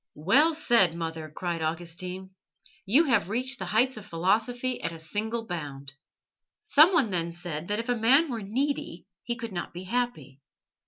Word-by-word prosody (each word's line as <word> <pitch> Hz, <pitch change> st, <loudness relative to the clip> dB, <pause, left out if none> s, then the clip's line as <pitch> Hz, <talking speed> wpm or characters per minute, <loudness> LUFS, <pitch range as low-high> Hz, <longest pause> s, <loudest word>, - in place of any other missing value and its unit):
"Well 270 Hz, -, +3 dB
said, 235 Hz, -, +3 dB
mother!" 160 Hz, -2 st, -5 dB
cried 170 Hz, +2 st, -4 dB
Augustine. 175 Hz, +3 st, -4 dB, 0.6 s
"You 265 Hz, +11 st, +5 dB
have 235 Hz, -, +1 dB
reached 255 Hz, +5 st, 0 dB
the -, -, -4 dB
heights 245 Hz, +3 st, +2 dB
of 210 Hz, -, -8 dB
philosophy 225 Hz, +9 st, 0 dB
at 165 Hz, -, -2 dB
a 165 Hz, -, -8 dB
single 220 Hz, +8 st, -3 dB
bound." 145 Hz, -6 st, -6 dB, 0.7 s
Someone 310 Hz, -, +5 dB
then 170 Hz, -2 st, -1 dB
said 170 Hz, -2 st, -6 dB
that 210 Hz, -, -1 dB
if 230 Hz, +2 st, -3 dB
a 245 Hz, -, +2 dB
man 265 Hz, +7 st, +4 dB
were 230 Hz, -2 st, -3 dB
needy 265 Hz, +8 st, -3 dB, 0.2 s
he 240 Hz, -, -3 dB
could 230 Hz, -1 st, -6 dB
not 175 Hz, -2 st, -5 dB
be 180 Hz, -, -6 dB
happy. 185 Hz, -, -3 dB
205 Hz, 165 wpm, -27 LUFS, 170-245 Hz, 0.7 s, You